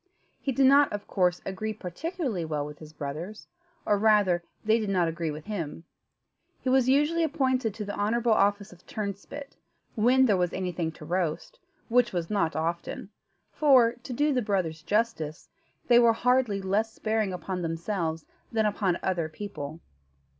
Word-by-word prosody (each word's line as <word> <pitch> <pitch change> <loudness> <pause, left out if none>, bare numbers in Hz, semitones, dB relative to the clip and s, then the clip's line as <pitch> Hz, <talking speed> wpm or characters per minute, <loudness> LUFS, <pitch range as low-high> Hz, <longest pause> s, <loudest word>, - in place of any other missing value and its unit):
He 275 - -2
did 270 +1 +3
not, 280 +2 +6
of 205 0 -4
course, 180 -2 +1
agree 215 +3 -3
particularly 220 - -4
well 150 -2 -2
with 150 0 -9
his 155 -1 -11
brothers, 155 +8 -6 0.4
or, 205 -1 +2
rather, 205 -5 +4 0.2
they 220 +1 +4
did 215 -2 -2
not 180 -3 +2
agree 165 0 -2
with 150 +1 -6
him. 165 -6 -5 0.8
He 260 - -2
was 260 -1 +4
usually 295 +5 +3
appointed 260 -8 0
to 210 - -5
the 205 - -4
honourable 230 +3 +1
office 200 -1 +1
of 180 - -19
turnspit, 215 +7 -6 0.4
when 255 +4 +4
there 205 -6 +3
was 180 -1 0
anything 180 -3 -2
to 155 - -11
roast, 175 - -2 0.3
which 245 -1 +3
was 170 0 -2
not 170 -6 +1
often; 170 +4 -3 0.4
for, 260 -6 +5
to 245 +2 -11
do 290 +4 +2
the 250 - +1
brothers 185 -7 -1
justice, 205 -6 -1 0.4
they 240 -1 +7
were 235 -1 +6
hardly 240 -4 +1
less 210 +4 0
sparing 215 -3 -1
upon 180 0 -4
themselves 165 -1 -2 0.3
than 220 -1 +1
upon 200 -4 +1
other 175 -4 0
people. 160 -4 -7
205 Hz, 165 wpm, -28 LUFS, 170-235 Hz, 0.8 s, they